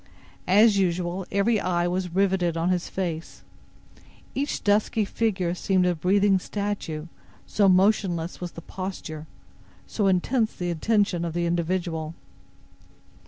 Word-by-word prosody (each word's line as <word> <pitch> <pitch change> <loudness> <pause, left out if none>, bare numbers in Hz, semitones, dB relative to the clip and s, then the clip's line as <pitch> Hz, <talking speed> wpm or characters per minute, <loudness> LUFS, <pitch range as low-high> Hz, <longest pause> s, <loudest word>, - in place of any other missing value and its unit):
As 205 +2 +5
usual, 180 0 -1
every 205 +3 +2
eye 175 -2 0
was 180 +1 -1
riveted 180 -2 +1
on 165 +2 +1
his 180 -1 -1
face. 170 -4 -4 0.9
Each 285 +2 -2
dusky 210 +1 +2
figure 190 -5 -1
seemed 185 0 +1
a 180 - +2
breathing 195 +3 +3
statue, 200 -6 -4 0.4
so 200 -2 +3
motionless 185 -3 +2
was 175 -1 -5
the 170 - -10
posture, 170 -5 -6 0.6
so 205 -3 -1
intense 215 +5 +1
the 175 -1 -2
attention 195 0 +1
of 170 -2 -3
the 175 0 0
individual. 170 -2 -2
185 Hz, 125 wpm, -25 LUFS, 170-200 Hz, 0.9 s, As